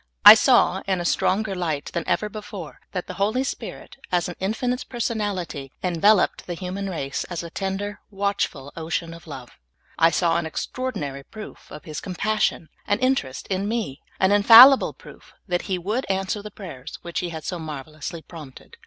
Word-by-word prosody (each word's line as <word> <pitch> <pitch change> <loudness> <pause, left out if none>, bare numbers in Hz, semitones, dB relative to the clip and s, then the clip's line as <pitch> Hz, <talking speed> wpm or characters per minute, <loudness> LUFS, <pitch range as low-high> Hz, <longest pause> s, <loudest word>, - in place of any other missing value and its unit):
I - - +15
saw, - - +4
in 190 -2 +1
a 175 - -3
stronger 195 +4 +1
light 160 -6 -3
than 170 - -1
ever 210 - +1
before, 205 -6 -8
that 180 -2 -3
the - - -7
Holy 220 +6 +2
Spirit, 270 - -6
as 175 -2 +1
an 175 - -6
infinite 245 +6 -1
personality, 205 - -3
enveloped 180 +3 +3
the 175 - -3
human 190 +3 -4
race 140 -6 -3
as 175 -1 -5
a 170 - -8
tender, 195 +2 -3
\vatchful 195 -8 -2
ocean 165 +1 -3
of 170 0 -13
love; 130 -5 -9 0.5
I 165 - +6
saw 165 0 +2
an 170 -1 -2
extraordinary 155 - -4
proof 215 +8 -11
of 150 - -9
His 155 -2 -6
compassion 200 -2 -1 0.2
and 205 +1 +1
interest 255 - 0
in 195 +1 -1
me, 220 - -3 0.2
an 190 +1 +3
infallible 230 +6 +9
proof - - -16
that 180 0 -2
He 185 - +1
would 210 +9 -2
answer 195 +2 -1
the 210 - -8
prayers 170 -11 -9
which 170 -1 -3
He 175 - -3
had 160 -2 -7
so 175 +1 -4
marvelously 155 +2 -7
prompted. 150 -6 -12
185 Hz, 175 wpm, -24 LUFS, 165-205 Hz, 0.5 s, I